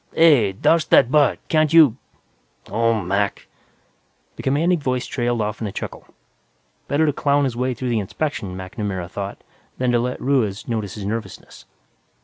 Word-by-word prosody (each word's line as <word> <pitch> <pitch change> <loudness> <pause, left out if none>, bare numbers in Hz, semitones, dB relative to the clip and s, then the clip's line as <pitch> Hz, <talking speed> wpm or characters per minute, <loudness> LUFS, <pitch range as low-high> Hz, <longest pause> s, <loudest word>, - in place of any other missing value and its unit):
"Hey, 145 -12 +5
douse 160 - +2
that 125 -1 +4
butt! 145 -3 +4
Can't 155 -1 +2
you... 155 -8 +7 0.8
oh, 115 -1 +1
Mac!" 100 +3 -1 0.9
The - - -8
commanding 160 +6 +1
voice 130 -3 -2
trailed 120 -2 -1
off 105 +1 -3
in 110 - -2
a - - -5
chuckle. - - -7 0.8
Better 150 +3 +2
to 150 - +1
clown 145 0 +1
his 130 -4 -1
way 125 +1 -1
through 125 +2 -4
the 115 -2 +1
inspection, 100 -3 -4
MacNamara 95 -2 -5
thought, 100 0 -6 0.3
than 125 -1 +1
to 120 - +3
let 125 +1 -2
Ruiz 120 -8 0
notice 110 -5 -3
his 105 -2 -6
nervousness. 105 -2 -6
120 Hz, 160 wpm, -21 LUFS, 105-140 Hz, 0.9 s, you